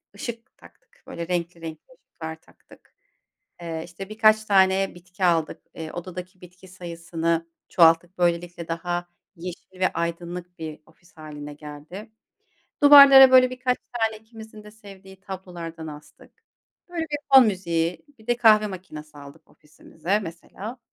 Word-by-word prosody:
ışık 230 -1 -8
taktık, 485 +1 -22
böyle 170 0 -6
renkli 170 -1 -3
renkli 165 - -10
ışıklar 160 -2 -9
taktık. - - -22 0.7
Eee, 165 -1 -5
işte 185 +3 -10
birkaç 215 0 +3
tane 195 -1 +3
bitki 180 +2 -7
aldık. 165 -3 +1
Eee, 160 -1 -7
odadaki 180 +1 -8
bitki 180 +1 -16
sayısını 170 -2 -3 0.2
çoğalttık. 170 +1 +4
Böylelikle 175 -1 -1
daha 175 +1 -3 0.3
yeşil 180 +2 -10
ve 185 - +4
aydınlık 170 +1 -5
bir 155 -1 -7
ofis 175 +4 -25
hâline 150 -2 -9
geldi. 150 +9 -10 0.7
Duvarlara 275 -2 +10
böyle 255 -1 +7
birkaç 255 0 -1 0.2
tane 225 -2 -1
ikimizin 220 -1 -13
de 210 - -13
sevdiği 195 -3 -15
tablolardan 175 -4 -8
astık. 150 0 -13 0.6
Böyle 345 -1 -4
bir 295 -2 -3 0.2
fon 260 -3 +9
müziği, 170 -3 -2
bir 220 - -20
de 240 0 +1
kahve 215 -3 +5
makinesi 155 -6 -10
aldık 145 +2 -14
ofisimize 165 +5 -4
mesela. 200 +6 -9
180 Hz, 135 wpm, -24 LUFS, 165-215 Hz, 0.7 s, Duvarlara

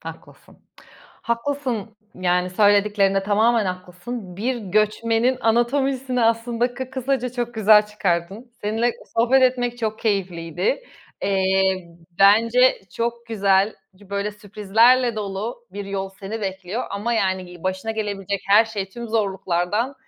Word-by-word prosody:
haklısın. - - -12 0.6
Haklısın, 235 -3 -3 0.2
yani, 180 0 0
söylediklerinde 205 0 +3
tamamen 215 +2 +2
haklısın. 185 +2 -6
Bir 245 +5 -1
göçmenin 225 +4 +1
anatomisini 250 +2 +1
aslında 230 +2 0
kı 260 +1 -6
kısaca 260 -1 -1
çok 240 -1 -3
güzel 215 -1 +5
çıkardın. 200 +3 -2
Seninle 225 +3 0 0.2
sohbet 245 +3 +4
etmek 245 -1 +1
çok 220 -2 -2
keyifliydi. 195 - -1 0.4
Eee, 190 -2 +1 0.3
bence 230 +6 +5 0.2
çok 235 0 -2
güzel, 200 -2 +2 0.2
böyle 200 +1 -3
sürprizlerle 220 +4 +2
dolu 210 +4 -5
bir 200 +1 -6
yol 195 -1 -3
seni 215 +3 -5
bekliyor 195 +3 -4
ama, 210 +4 -2
yani, 190 -4 0
gi 175 -1 -13
başına 190 +4 -2
gelebilecek 200 -3 -3
her 210 +3 +7
şey 210 -4 -5
tüm 235 +4 -8
zorluklardan 200 +2 -1
215 Hz, 120 wpm, -22 LUFS, 195-235 Hz, 0.6 s, her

